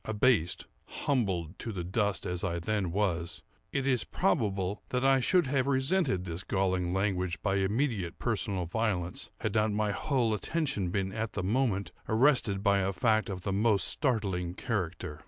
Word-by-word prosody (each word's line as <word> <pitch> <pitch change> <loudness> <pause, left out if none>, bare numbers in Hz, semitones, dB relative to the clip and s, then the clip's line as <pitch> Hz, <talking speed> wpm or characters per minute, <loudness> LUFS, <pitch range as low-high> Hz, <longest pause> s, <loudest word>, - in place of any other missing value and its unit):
Abased, 110 -5 +1 0.2
humbled 95 - -1
to 115 - -4
the 95 -4 -4
dust 100 +2 0
as 90 +1 -3
I 85 -3 -1
then 95 0 -1
was, 85 -3 -1 0.3
it 135 -1 -1
is 130 -3 +2
probable 95 -1 0
that 125 +1 0
I 135 0 +5
should 175 +6 +3
have 130 0 0
resented 135 - +1
this 85 0 -4
galling 95 -2 0
language 95 -2 0
by 100 -1 +1
immediate 100 -2 0
personal 100 -5 -1
violence, 90 -2 -2
had - - -1
not 110 -1 +2
my 105 0 +1
whole 120 0 0
attention 105 - -1
been 95 +1 -1
at 110 0 -3
the 95 - -3
moment 105 -1 0 0.2
arrested 110 -4 +3
by 100 -1 +4
a 95 0 +1
fact 110 +1 +1
of 95 -2 -4
the 100 +1 -2
most 105 0 +2
startling 95 - 0
character. 90 - -3
100 Hz, 165 wpm, -30 LUFS, 90-120 Hz, 0.3 s, I